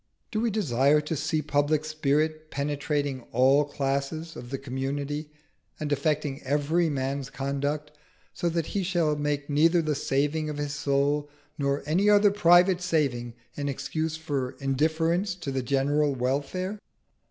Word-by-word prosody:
Do 215 - -1
we 235 - +2
desire 150 - +3
to 150 +2 -3
see 155 +1 -1
public 145 +1 +1
spirit 155 +1 0
penetrating 145 -1 -2
all 135 +4 +5
classes 140 +3 -2
of 120 0 -8
the 135 - -3
community 140 +3 -3 0.5
and 150 -2 -3
affecting 150 -1 0
every 150 +5 +1
man's 135 -1 -2
conduct, 140 +3 -2 0.4
so 175 - -1
that 165 -1 -1
he 200 - -2
shall 170 -5 +1
make 145 -1 -2
neither 165 +4 +4
the 155 -2 0
saving 145 +3 0
of 150 - -4
his 145 -1 -3
soul 145 0 0 0.3
nor 140 0 0
any 180 +8 +2
other 205 0 +6
private 180 -1 +5
saving 135 -9 0 0.2
an 145 -1 -2
excuse 155 +4 -2
for 140 -5 -3
indifference 160 +7 +1
to 155 -6 -5
the 135 -1 -1
general 140 +2 +1
welfare? 140 +11 -2
145 Hz, 145 wpm, -27 LUFS, 140-160 Hz, 0.5 s, other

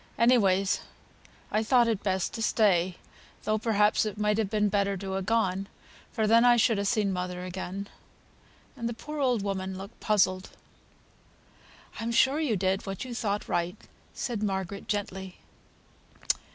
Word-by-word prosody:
Anyways 200 -5 +3 0.7
I 215 - +2
thought 240 +2 +4
it 220 -4 0
best 190 -2 -1
to 225 - -5
stay, 185 -6 +2 0.5
though 215 0 0
perhaps 210 -2 +3
it 215 -1 -4
might 210 0 +1
have 215 -3 0
been 210 -1 +2
better 200 -1 +1
to 190 0 -4
ha' 195 - -2
gone, 195 -3 0 0.4
for 220 -2 0
then 230 +2 +5
I 245 -1 +6
should 225 -2 +3
ha' 200 - -1
seen 205 -2 +1
mother 180 0 -4
again;" 190 +2 -5 0.9
and 235 -3 -3
the 235 - -5
poor 300 +5 -7
old 250 -6 +1
woman 190 -1 -3
looked 195 +4 -10
puzzled. 190 -3 +1 1.5
"I'm 230 +1 -2
sure 265 +5 +3
you 285 -9 +1
did 190 +2 0
what 195 +4 -4
you 250 - -6
thought 210 -3 -2
right," 175 +1 -1 0.4
said 235 -4 -3
Margaret, 195 -1 -3
gently. 190 -3 -4
205 Hz, 155 wpm, -28 LUFS, 190-225 Hz, 1.5 s, I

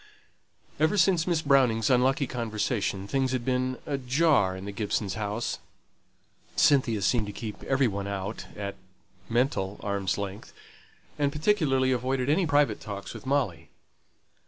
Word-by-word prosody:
Ever 160 +7 +3
since 180 -2 +3
Miss 165 -3 +1
Browning's 130 -4 +3
unlucky 130 +3 +3
conversation, 110 -4 -2
things 130 +3 0
had 125 -2 -2
been 130 0 0
ajar 135 - +2
in 95 - -8
the 100 - -4
Gibsons' 100 -1 -2
house. 105 +2 -3 1.0
Cynthia 120 -7 +3
seemed 115 -4 +2
to - - -4
keep 105 +1 -7
every 135 -1 +2
one 100 -2 -3
out 100 +2 -4
at 100 -1 -4 0.6
(mental) 115 -5 0
arms' 100 -3 -1
length; 100 +1 -6 0.7
and 140 -1 +2
particularly 150 -6 +2
avoided 130 +2 0
any 170 +3 +2
private 145 -8 +2
talks 100 -2 -6
with - - -10
Molly. 115 -13 0
125 Hz, 135 wpm, -27 LUFS, 100-140 Hz, 1.0 s, Ever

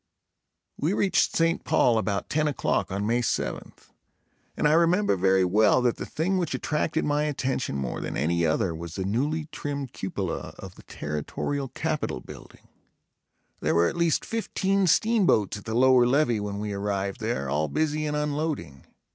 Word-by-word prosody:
We 160 +6 0
reached 190 -5 +2
St. 165 +1 +1
Paul 115 -2 +3
about 100 -2 -2
ten 155 0 +1
o'clock 100 -9 -1
on 100 +2 -2
May 120 +3 +1
seventh 115 - -4 0.7
and - - +3
I 150 - +4
remember 170 - +3
very 95 0 +3
well 105 +7 +4
that 120 -2 +1
the - - -6
thing 185 +4 0
which 170 -6 -1
attracted 150 +4 -1
my 150 0 +1
attention 130 - -2
more 65 -3 -3
than - - -4
any 85 +5 +1
other 80 +2 +1
was 85 +1 -7
the 95 - -3
newly 145 +10 -1
trimmed 140 -3 -5
cupola 95 -1 -4
of - - -9
the - - -15
Territorial 75 - -4
Capitol 150 +4 -3
building. - - -13 0.9
There - - 0
were 85 +1 +4
at - - -6
least 170 -2 +1
fifteen 195 -4 0
steamboats 185 - +3
at 105 - -12
the 110 0 -3
lower 125 0 +5
levee 125 -4 +2
when 105 -1 -4
we 105 0 -3
arrived 100 -1 -2
there, 110 - -2
all 75 +3 0
busy 155 - -1
in 150 - -2
unloading. 150 - -3
125 Hz, 170 wpm, -26 LUFS, 100-155 Hz, 0.9 s, lower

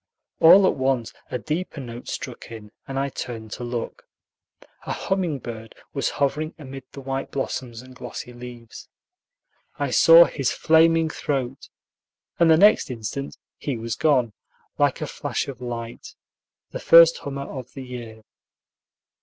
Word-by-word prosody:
All 190 +4 +8
at - - +3
once 130 -3 -1 0.2
a - - -2
deeper 155 +5 -4
note 120 -2 -8
struck 130 -4 -6
in, 105 -2 -10 0.2
and 135 - -5
I 140 +1 0
turned 115 -5 -7
to 125 - -6
look. 120 -1 -5 0.8
A - - -1
humming 185 -6 -1
bird 115 -3 -9 0.2
was - - 0
hovering 150 +3 -1
amid 135 -3 -9
the 140 - -9
white 135 0 -4
blossoms 125 -3 -4
and 130 0 -14
glossy 125 - -8
leaves. 120 -1 -11 0.9
I - - -2
saw - - +8
his - - -1
flaming 165 0 +3
throat, 135 -3 -3 0.7
and 170 -1 +5
the 160 - +7
next 205 -2 +5
instant 125 +3 -5 0.2
he 140 -5 -3
was 115 0 -4
gone, 130 -8 +2 0.5
like - - +2
a - - -1
flash - - -3
of 135 -3 -8
light, 120 -1 -7 0.6
the - - -5
first 165 0 +7
hummer 140 -1 -5
of 130 -2 -8
the 135 - -7
year. 120 -3 -9
130 Hz, 150 wpm, -23 LUFS, 120-150 Hz, 0.9 s, All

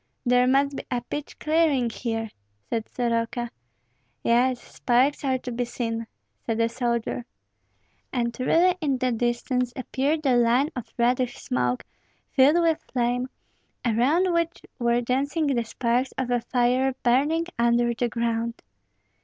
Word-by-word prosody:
"There 250 0 +4
must 275 +2 +3
be - - -5
a 245 -2 -1
pitch 290 +4 -6
clearing 305 -6 +2
here," 225 -2 -3 0.4
said 225 -1 -3
Soroka. 235 0 -1 0.7
"Yes, 245 +1 +3
sparks 260 +5 +1
are 260 -2 +1
to 250 0 -7
be 245 +1 -1
seen," 230 -1 -3 0.4
said 225 -1 -2
a 230 0 +3
soldier. 235 0 -2 0.9
And 235 -2 -1
really 345 +8 +4
in 280 -4 +1
the 255 0 0
distance 240 +1 0
appeared 285 +4 -1
a 260 -2 +4
line 240 +6 +3
of 250 - -6
reddish 245 +1 +1
smoke, 125 - -1 0.5
filled 290 +6 +5
with 325 -1 +1
flame, 245 0 0 0.6
around 285 +11 +2
which 335 0 -1 0.2
were 235 0 +2
dancing 280 +6 0
the 260 -5 +1
sparks 240 +3 -1
of 260 -2 -1
a 245 -1 +2
fire 250 +2 +1
burning 290 +7 +2
under 235 0 +3
the 240 +1 -1
ground. 230 0 -1
245 Hz, 140 wpm, -25 LUFS, 235-270 Hz, 0.9 s, filled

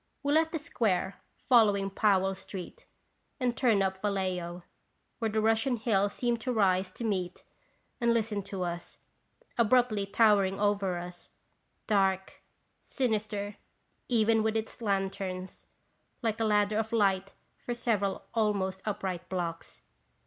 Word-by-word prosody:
We 285 +1 +1
left 320 +1 +3
the 325 - -1
Square, 200 - -1 0.3
following 205 -5 +4
Powell 195 -2 +2
street, 190 -1 -8 0.5
and 245 -2 0
turned 225 -7 +3
up 190 0 -2
Vallejo, 185 -4 -2 0.6
where 225 -2 0
Russian 225 +4 +2
Hill 205 -3 +2
seemed 235 +2 -1
to 255 - -1
rise 190 -4 +2
to 210 - -8
meet 185 -5 -2 0.6
and 235 -2 +3
listen 220 -3 0
to 190 -2 -4
us, 175 0 -5 0.6
abruptly 230 -3 +3
towering 200 -3 +4
above 205 0 +1
us, 180 -2 -4 0.6
dark, 190 -2 +1 0.4
sinister 210 -4 -2 0.5
even 225 -2 +3
with 220 0 +1
its 220 +2 -5
lanterns, 195 -2 -3 0.6
like 225 -1 0
a 225 - +1
ladder 210 0 +2
of 220 0 -2
light 195 -3 +1 0.3
for 240 - -3
several 210 -5 0
almost 200 -4 0
upright 185 -3 -3
blocks. 170 -3 -4
205 Hz, 125 wpm, -30 LUFS, 190-225 Hz, 0.6 s, following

